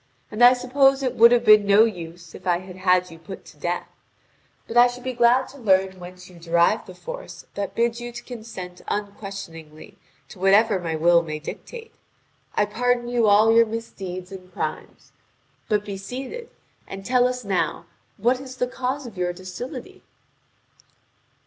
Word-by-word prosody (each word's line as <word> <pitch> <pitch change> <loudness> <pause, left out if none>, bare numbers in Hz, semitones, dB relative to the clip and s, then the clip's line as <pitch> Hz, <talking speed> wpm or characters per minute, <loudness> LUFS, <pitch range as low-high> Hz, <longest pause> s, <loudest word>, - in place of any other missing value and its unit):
And 220 +3 +1
I 245 +1 +9
suppose 270 +2 +2
it 255 - 0
would 235 +1 +7
have 245 -1 +3
been 215 -1 +7
no 200 +2 +7
use, 170 -4 -7
if - - -11
I 175 -1 +3
had 185 0 -11
had 180 -1 +2
you 165 - -12
put 180 +4 -10
to - - -16
death. 175 +4 -3 0.8
But 225 - -7
I 240 +1 +8
should 245 0 -8
be 260 0 -3
glad 240 +2 +3
to 280 - -14
learn 190 -4 +2
whence 180 0 -11
you 180 -2 -15
derive 170 0 +2
the - - -11
force - - -9
that 200 -1 -4
bids 235 0 0
you 240 0 -6
to 240 0 -9
consent 220 -7 -9
unquestioningly 195 -7 -7 0.3
to - - -13
whatever 200 +2 +4
my 165 -2 -3
will 170 +2 +4
may 155 -2 -5
dictate. 455 - -9 0.6
I 210 - +3
pardon 240 +3 0
you 240 -2 +2
all 215 +2 +5
your 230 0 +6
misdeeds 195 -5 -6
and 185 -1 -11
crimes. 155 -3 -6 0.6
But 210 -1 +1
be 200 -2 -5
seated, 265 - -7 0.4
and 195 0 -8
tell 250 0 +3
us 250 -2 -4
now 195 -2 -1 0.3
what 245 +5 +1
is 260 -1 -9
the 250 - +1
cause 260 +2 -3
of 225 -5 -10
your 175 0 0
docility?" 185 +7 -8
205 Hz, 175 wpm, -23 LUFS, 180-245 Hz, 0.8 s, I